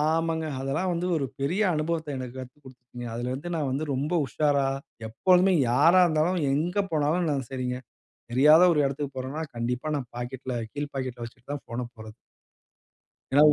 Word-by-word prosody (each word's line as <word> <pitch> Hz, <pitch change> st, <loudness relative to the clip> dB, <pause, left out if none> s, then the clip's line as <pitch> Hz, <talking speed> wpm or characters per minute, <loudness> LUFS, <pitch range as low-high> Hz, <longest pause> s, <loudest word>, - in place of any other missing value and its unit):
ஆமாங்க, 160 Hz, +1 st, +1 dB
அதெல்லாம் 155 Hz, +8 st, -1 dB
வந்து 170 Hz, +1 st, -1 dB
ஒரு 140 Hz, -3 st, -1 dB
பெரிய 175 Hz, +10 st, +1 dB
அனுபவத்த 155 Hz, -1 st, -2 dB
எனக்கு 130 Hz, -1 st, -6 dB
கத்துக் 130 Hz, +3 st, -10 dB
குடுத்துட்டுச்சுங்க. 125 Hz, -2 st, -10 dB
அதுலருந்து 130 Hz, +8 st, -3 dB
நான் 150 Hz, -4 st, -1 dB
வந்து 140 Hz, +4 st, -1 dB
ரொம்ப 145 Hz, +6 st, -2 dB
உஷாரா 140 Hz, +3 st, +1 dB, 0.4 s
எப்பொழுமே 185 Hz, -, +4 dB, 0.2 s
யாரா 160 Hz, +9 st, +6 dB
இருந்தாலும், 165 Hz, +3 st, +1 dB
எங்க 170 Hz, +6 st, -1 dB, 0.2 s
போனாலும் 160 Hz, +3 st, +1 dB
நான் 135 Hz, -4 st, -1 dB
செரிங்க. 125 Hz, -1 st, -2 dB, 0.5 s
தெரியாத 150 Hz, +7 st, +7 dB
ஒரு 155 Hz, -, +1 dB
எடத்துக்கு 140 Hz, 0 st, -4 dB
போறன்னா, 130 Hz, +5 st, -4 dB
கண்டிப்பா 125 Hz, +5 st, -2 dB
நான் 125 Hz, -4 st, -5 dB
பாக்கெட்ல 125 Hz, +1 st, -5 dB, 0.2 s
கீழ் 145 Hz, 0 st, -4 dB
பாக்கெட்ல 130 Hz, -3 st, -4 dB
வச்சுட்டுதான் 130 Hz, +5 st, -8 dB
போன 120 Hz, +1 st, -3 dB
போறது. 110 Hz, -1 st, -11 dB, 1.2 s
ஏன்னா 145 Hz, +2 st, +6 dB
உ -, -, +5 dB
140 Hz, 155 wpm, -27 LUFS, 125-160 Hz, 1.2 s, தெரியாத